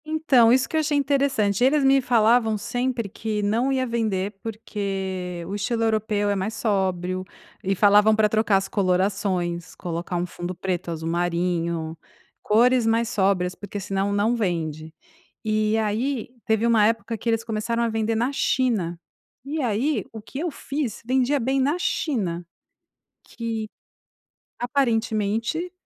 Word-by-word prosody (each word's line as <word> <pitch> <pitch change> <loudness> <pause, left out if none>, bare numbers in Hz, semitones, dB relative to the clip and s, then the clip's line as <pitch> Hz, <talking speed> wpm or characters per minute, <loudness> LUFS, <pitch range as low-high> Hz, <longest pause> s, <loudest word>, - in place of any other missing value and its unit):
Então, 310 -7 +4
isso 255 +1 +3
que - - -6
eu - - +4
achei 300 -1 +1
interessante, 275 -7 +1
eles 280 +3 +4
me 270 0 +5
falavam 230 -2 +3
sempre 245 +1 -2
que 210 +1 -3
não 230 +6 +1
ia 260 -1 +1
vender, 215 -5 -1
porque 190 -5 -4
o 195 - -5
estilo 225 +3 -1
europeu 215 -2 +1
é - - +1
mais 200 +3 -2
sóbrio 185 -4 -1 0.4
e 195 0 0
falavam 210 +2 +5
pra 215 0 +4
trocar 215 -1 +2
as 195 0 -2
colorações, 185 -3 0
colocar 175 0 -4
um 175 0 0
fundo 175 +1 -6
preto, 180 -1 -3
azul 160 -1 -4
marinho, 170 -1 -1 0.5
cores 240 +2 +3
mais 230 +1 +2
sóbrias 190 -4 +1
porque 205 +1 -7
senão 195 0 -1
não 205 +4 +2
vende, 160 -7 -2 0.5
e 215 0 +1
aí 225 +4 -1 0.2
teve 220 +1 +1
um 235 -1 +4
época 225 +2 +2
que 230 +2 -2
eles 225 0 +1
começaram 230 +1 -2
a 235 - +2
vender 225 0 0
na 235 +4 +1
China. 215 -12 0 0.4
E 300 +3 -3
aí, 240 +1 0
o 220 - -7
que 265 - -9
eu 340 +3 -1
fiz 275 -7 -4
vendia 260 +3 +2
bem 265 +3 0
na 285 +5 +2
China. 190 - -1 0.8
Que, 225 -2 -4 0.9
aparentemente, 235 - 0
220 Hz, 150 wpm, -24 LUFS, 190-240 Hz, 0.9 s, me